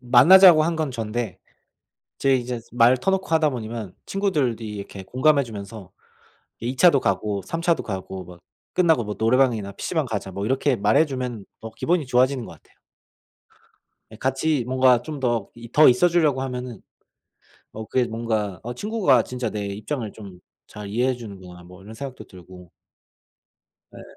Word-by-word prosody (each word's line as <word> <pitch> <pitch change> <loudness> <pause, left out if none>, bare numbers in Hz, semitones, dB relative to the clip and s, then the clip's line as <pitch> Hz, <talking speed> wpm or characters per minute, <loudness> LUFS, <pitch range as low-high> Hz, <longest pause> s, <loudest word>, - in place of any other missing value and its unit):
만나자고 155 +8 +7
한 165 +1 -1
건 155 -3 -2
전데 115 -4 -4 0.8
제 135 -1 +2
이제 125 -1 -3
말 120 +2 +4
터 130 +10 0
놓고 190 0 -1
하다 160 -1 +2
보면 115 -6 -6
친구들이 150 - -1
이렇게 100 -1 -8
공감해 140 +8 +2
주면서 105 -4 -9 0.7
2 120 +3 -4
차도 155 0 +5
가고 100 -1 -1
3 165 - -4
차도 170 -1 +1
가고 95 -2 -6
뭐 90 0 -14 0.3
"끝나고 165 -8 +3
뭐 105 -1 -5
노래방이나 115 -3 +2
PC방 160 - -2
가자." 105 -5 -4
뭐 100 +2 -4
이렇게 130 +3 +1
말해 105 +9 +3
주면 125 -7 -5 0.2
어 110 0 -8
기분이 160 +8 -1
좋아지는 125 0 +1
것 - - -10
같아요. 80 - -24 1.4
예 - - -10
같이 135 +2 0
뭔가 130 -1 +3
좀 150 +2 -7
더 120 -5 -1
이 115 -1 -11
더 155 - +7
있어 125 +8 +4
주려고 155 -6 +1
하면은 125 -4 -6 0.9
어 110 0 -7
그게 130 +2 +1
뭔가 110 -5 -3
어 120 +2 -6
'친구가 205 - +2
진짜 125 -2 -4
내 105 -1 -4
입장을 105 +3 -5
좀 95 -5 -12 0.3
잘 105 -1 -9
이해해 125 +5 0
주는구나.' 95 -7 -11
뭐 90 +2 -15
이런 105 +3 -11
생각도 130 +2 -8
들고. 90 -1 -14 1.3
예. - - -11
120 Hz, 310 characters per minute, -23 LUFS, 105-135 Hz, 1.4 s, 만나자고